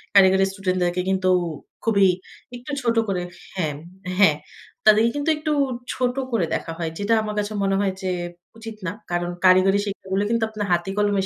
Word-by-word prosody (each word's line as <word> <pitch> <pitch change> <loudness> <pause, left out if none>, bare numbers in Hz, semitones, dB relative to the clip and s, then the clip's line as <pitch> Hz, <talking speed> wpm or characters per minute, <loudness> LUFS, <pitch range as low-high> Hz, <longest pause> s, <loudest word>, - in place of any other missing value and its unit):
কারিগর 190 -1 +7
স্টুডেন্টদেরকে 185 -2 0
কিন্তু 190 -1 +1 0.5
খুবই 200 -4 +4 0.5
একটু 250 +4 -8
ছোট 235 -1 +1
করে 185 -2 -1 0.3
হ্যাঁ, 155 -5 -1 0.5
হ্যাঁ। 155 -7 +6 0.5
তাদেরকে 215 +2 +6
কিন্তু 290 +2 -1
একটু 305 0 -2 0.4
ছোট 250 -1 0 0.2
করে 220 -8 +1
দেখা 165 - -4
হয়। 165 -2 -2
যেটা 205 +3 +1
আমার 210 -1 -4
কাছে 205 +1 -2
মনে 195 0 +2
হয় 195 -2 +1
যে, 185 -1 -1 0.5
উচিত 225 -1 -8
না। - - -1 0.2
কারণ 175 0 -1 0.2
কারিগরি 185 +2 +5
শিক্ষাগুলো 195 0 -2
কিন্তু 230 0 +1
আপনার 215 -1 -4
হাতে-কলমের 195 +3 +1
195 Hz, 160 wpm, -23 LUFS, 185-220 Hz, 0.5 s, কারিগর